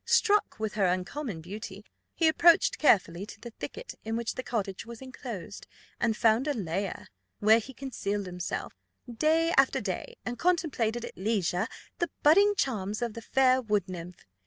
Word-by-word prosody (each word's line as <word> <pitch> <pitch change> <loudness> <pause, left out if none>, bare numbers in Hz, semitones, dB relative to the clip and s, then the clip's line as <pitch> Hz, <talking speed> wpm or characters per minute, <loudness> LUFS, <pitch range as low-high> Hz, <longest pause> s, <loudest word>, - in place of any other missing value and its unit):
Struck 415 -1 +3
with 220 -2 -2
her 200 -3 +2
uncommon 185 - -2
beauty, 200 +3 -8 0.3
he 330 - +3
approached 335 +1 +5
carefully 185 - +3
to - - -11
the 235 - -9
thicket - - -6
in 225 +1 -3
which 235 0 -2
the - - -4
cottage 200 -6 -3
was 235 -1 -10
enclosed, 240 -7 -8 0.3
and 230 -2 +1
found 230 +4 +3
a 295 - 0
lair, 195 -1 -3 0.3
where 220 +2 +5
he 245 +4 -9
concealed 205 -6 -3
himself, 180 -1 -4 0.3
day 315 +7 +2
after 270 0 +4
day, 195 -6 -4
and 245 -1 -4
contemplated 275 -10 +1
at - - -9
leisure 195 -1 0 0.3
the 345 - 0
budding 400 +7 +6
charms 215 - -1
of 235 -2 -2
the 230 - -7
fair 260 +2 +3
wood 210 -4 0
nymph. 180 -4 -8
225 Hz, 165 wpm, -29 LUFS, 200-270 Hz, 0.3 s, budding